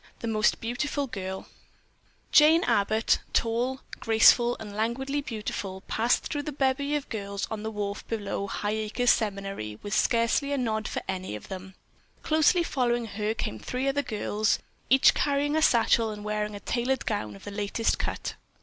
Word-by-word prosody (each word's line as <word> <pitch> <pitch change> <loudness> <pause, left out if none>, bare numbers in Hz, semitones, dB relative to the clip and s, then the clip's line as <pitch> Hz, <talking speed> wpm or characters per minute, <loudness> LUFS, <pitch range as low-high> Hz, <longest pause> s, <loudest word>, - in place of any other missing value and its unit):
THE 230 - -4
MOST 215 -1 +2
BEAUTIFUL 260 +5 -2
GIRL 190 -6 -5 0.9
Jane 315 +3 +6
Abbott, 215 +2 +2
tall, 245 +3 0 0.2
graceful 235 +2 +5
and 210 -2 -8
languidly 265 +6 -1
beautiful, 210 -6 -5
passed 230 +5 +1
through 290 - -3
the 300 - -5
bevy 280 +1 0
of 290 - -2
girls 200 -3 -4
on 220 -1 -3
the 220 - -3
wharf 205 -1 -4
below 205 -3 -3
Highacres 215 +4 0
Seminary 195 - -2
with 205 - -4
scarcely 235 +4 +2
a - - 0
nod 220 -4 -1
for - - -4
any 185 - -3
of 105 - -10
them. 190 0 -8 0.5
Closely 315 +3 +3
following 240 -6 0
her 215 0 -2
came 110 - -3
three 250 - -3
other 280 +1 +1
girls, 215 -3 0 0.3
each 265 +1 +6
carrying 285 +1 +1
a 315 - +2
satchel 230 -4 +4
and 210 -1 -7
wearing 210 0 -2
a - - -6
tailored 245 +4 -1
gown 110 - -2
of 100 - -14
the - - -7
latest 205 +2 -1
cut. - - -3
225 Hz, 165 wpm, -27 LUFS, 205-260 Hz, 0.9 s, Jane